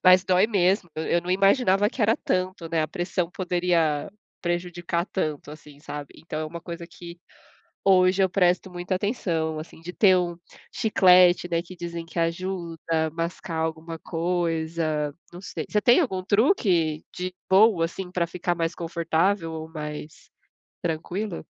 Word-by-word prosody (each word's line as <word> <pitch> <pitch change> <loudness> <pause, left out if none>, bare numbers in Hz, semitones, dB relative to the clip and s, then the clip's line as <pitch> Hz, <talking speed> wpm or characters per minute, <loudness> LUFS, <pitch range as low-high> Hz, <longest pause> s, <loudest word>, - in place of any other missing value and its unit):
mas 185 0 +7
dói 185 +2 +4
mesmo, 190 -3 +1
eu 160 - -2
eu 170 0 +1
não 180 - -4
imaginava 195 +1 +4
que 240 0 -3
era 220 +2 +4
tanto, 185 -2 -2
né, 160 -1 +1
a 155 - -2
pressão 175 0 -2
poderia 175 -4 0 0.3
prejudicar 175 0 -2
tanto, 155 -6 -3
assim, 150 -1 -13
sabe, 145 -2 -8
então 155 -1 -6
é - - -2
uma 170 +2 -7
coisa 170 -1 -7
que 170 0 -11 0.7
hoje 185 0 +5
eu 190 - +4
presto 180 0 +2
muita 180 +1 -2
atenção, 165 -7 -1
assim, 160 0 -11
de 175 +2 -7
ter 190 -2 +5
um 175 -1 -2 0.4
chiclete, 180 -5 +5
né, 170 0 0
que 185 +1 -12
dizem 170 -1 -5
que 170 +1 -8
ajuda, 165 -2 -1
mascar 165 0 -4
alguma 160 +1 -3
coisa, 165 -3 -1 0.2
não 175 - -9
sei, - - -5
você 210 - +1
tem 240 - +5
algum 190 - -1
truque 190 - +2
de 180 0 -4 0.2
boa, 190 -3 +5
assim, 180 +2 -5
pra 180 -2 0
ficar 175 0 -2
mais 165 0 -1
confortável 170 +1 0
ou 160 0 -6
mais 150 -1 -8 0.5
tranquilo? 175 +3 -3
175 Hz, 160 wpm, -25 LUFS, 165-185 Hz, 0.7 s, mas